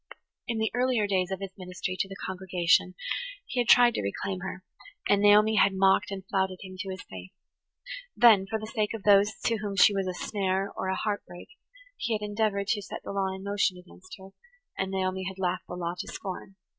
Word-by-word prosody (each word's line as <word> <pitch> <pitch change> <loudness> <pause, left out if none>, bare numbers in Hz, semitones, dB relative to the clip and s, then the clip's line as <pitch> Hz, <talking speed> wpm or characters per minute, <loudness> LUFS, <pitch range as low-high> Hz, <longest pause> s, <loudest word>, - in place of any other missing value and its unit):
In 230 - -2
the 220 -1 0
earlier 245 -3 +1
days 190 -2 0
of 190 0 -4
his 195 -1 -6
ministry 180 0 -4
to 195 - 0
the 195 - -7
congregation 185 -1 +1 0.5
he 250 - -3
had 240 - +1
tried 245 -1 +7
to - - -2
reclaim 185 - -3
her, 185 0 -6 0.4
and 200 0 +3
Naomi 210 +1 +5
had 195 - +5
mocked 190 0 +3
and 195 -1 -6
flouted 190 -1 0
him 185 -1 -9
to 195 0 -4
his 185 -1 -6
face. 95 -1 -10 0.9
Then, 215 -5 +6
for 220 - -1
the 215 - -7
sake 215 -1 -2
of 215 - -8
those 205 +1 +5
to 230 - +2
whom 205 -2 -4
she 200 +1 +6
was 195 -1 -1
a 180 - -3
snare 195 0 -1
or - - -3
a 190 - 0
heart 205 +1 -2
break, 175 +6 -11 0.5
he 235 - -2
had 210 - -4
endeavoured 205 -1 -1
to 215 -3 +1
set - - -8
the - - -6
law 195 -1 0
in 190 0 -6
motion 200 -2 0
against 180 +1 -13
her, 190 0 -12 0.5
and 190 - -2
Naomi 190 0 -2
had 190 0 -5
laughed 185 -1 -2
the 180 - -6
law 170 -1 -3
to - - -5
scorn. 190 0 -7
195 Hz, 220 wpm, -28 LUFS, 185-210 Hz, 0.9 s, tried